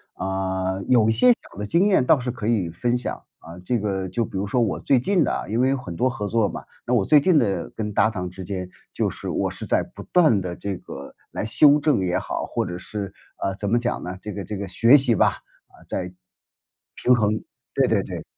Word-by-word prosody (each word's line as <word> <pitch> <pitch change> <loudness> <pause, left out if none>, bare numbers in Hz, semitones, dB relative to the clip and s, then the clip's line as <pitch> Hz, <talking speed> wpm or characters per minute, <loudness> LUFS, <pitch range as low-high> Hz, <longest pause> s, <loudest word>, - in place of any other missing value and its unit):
啊， 95 0 -2
有 120 -4 +4
一 - - +4
些 250 - +4
小 - - -17
的 105 - -3
经 170 - +3
验 190 -10 +3
倒 150 - +5
是 125 -1 -3
可 115 -3 -5
以 105 -7 +1
分 120 +9 -1
享 120 - -4 0.2
啊。 85 +2 -11
这 125 - +1
个 95 -2 -2
就 120 +5 -1
比 100 - -6
如 100 +2 -2
说 120 +4 +1
我 110 - 0
最 135 - +3
近 180 +6 +2
的 - - -2
因 110 +3 0
为 130 +1 +3
有 135 - +1
很 95 -10 -7
多 130 +8 +2
合 105 -4 -4
作 110 0 +2
嘛， - - -6 0.2
那 125 - -1
我 115 -5 +3
最 150 +9 +6
近 165 +3 +3
的 100 - 0
跟 105 -2 -4
搭 110 - +3
档 90 -5 -4
之 95 +1 -9
间 90 -1 -5 0.2
就 - - 0
是 - - -8
我 - - -1
是 - - -6
在 - - +1
不 - - -12
断 155 - +4
地 90 -1 -5
这 100 0 -4
个 70 -4 -10 0.2
来 - - -4
修 145 +7 +5
正 150 -4 +2
也 90 -1 0
好， - - -3
或 - - -2
者 90 0 -5
是， 100 +1 -6 0.2
啊， 95 - -2
怎 100 +1 -3
么 120 - +3
讲 120 +1 -2
呢？ 90 +1 -6
这 105 - -6
个 100 -1 -5
这 105 - -5
个 100 - -4
学 115 +8 +6
习 130 -4 +3
吧， 105 - +3 0.4
啊， - - -20
在 - - -2
平 - - -6
衡， - - -33 1.6
对 - - +3
对 - - +2
对。 - - -7
105 Hz, 260 characters per minute, -23 LUFS, 95-125 Hz, 1.6 s, 最